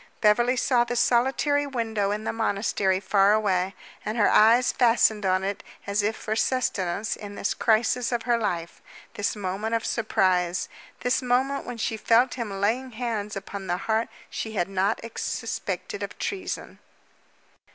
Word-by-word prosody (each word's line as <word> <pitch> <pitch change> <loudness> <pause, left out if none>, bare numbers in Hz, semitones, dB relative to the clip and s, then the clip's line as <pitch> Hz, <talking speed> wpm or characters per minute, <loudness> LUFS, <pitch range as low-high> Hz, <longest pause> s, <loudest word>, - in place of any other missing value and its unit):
Beverly 240 +4 +4
saw 245 -1 +3
the 240 0 -4
solitary 270 +5 +2
window 225 -6 -1
in 210 +1 -2
the - - -2
monastery 200 -3 0
far 195 +1 +3
away, 190 -3 +1 0.3
and 215 +2 -3
her 210 - +4
eyes 235 +3 +5
fastened 225 -4 +3
on 185 0 +2
it 200 +1 -3 0.2
as 200 +1 0
if 215 +2 0
for 215 - -3
sustenance 215 -5 0
in 205 -1 -9
this 200 - -1
crisis 235 +2 +1
of 240 -2 -1
her 240 -1 +2
life 170 -6 -3 0.3
this 205 - -1
moment 205 +3 -2
of 225 - -2
surprise 185 -6 +1 0.3
this 250 +2 +1
moment 260 +3 0
when 245 -1 -5
she 220 0 -2
felt 235 +4 +3
him 235 -4 -4
laying 240 +5 0
hands 220 -3 -3
upon 195 0 -6
the 175 0 0
heart 220 +4 0 0.2
she 220 - -5
had 175 -5 0
not 195 0 0 0.2
suspected 415 -5 -4
of - - -5
treason. 395 -1 -4
220 Hz, 160 wpm, -26 LUFS, 200-240 Hz, 0.3 s, eyes